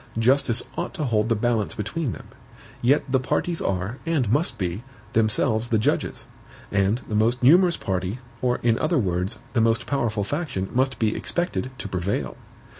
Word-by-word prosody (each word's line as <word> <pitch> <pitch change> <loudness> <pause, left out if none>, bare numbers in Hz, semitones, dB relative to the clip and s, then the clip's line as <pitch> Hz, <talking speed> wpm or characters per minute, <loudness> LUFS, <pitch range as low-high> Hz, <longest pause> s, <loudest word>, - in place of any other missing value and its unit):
Justice 120 0 +3 0.2
ought 175 - -4
to 160 - -2
hold 115 -4 +1
the 115 - +3
balance 115 -1 0
between 120 +6 -2
them. - - -9 0.6
Yet 135 +5 +3
the 130 - +4
parties 165 +6 -1
are, 95 +6 -2
and 150 -10 0
must 145 -2 +2
be, 90 +1 -2 0.3
themselves 110 +1 +2
the 115 - +3
judges; 110 - -1 0.5
and 100 +2 +2
the 110 - -5
most 115 +4 +2
numerous 175 +6 +6
party, 95 +3 -2 0.2
or, 125 -1 +1
in 115 -1 +3
other 155 +2 +1
words, 90 -5 0 0.2
the 120 - +3
most 115 0 +2
powerful 115 -7 0
faction 140 - -3
must 130 0 +1
be 110 -1 +1
expected 130 - -2
to 115 - -5
prevail. 90 -7 -2
115 Hz, 170 wpm, -24 LUFS, 105-135 Hz, 0.6 s, numerous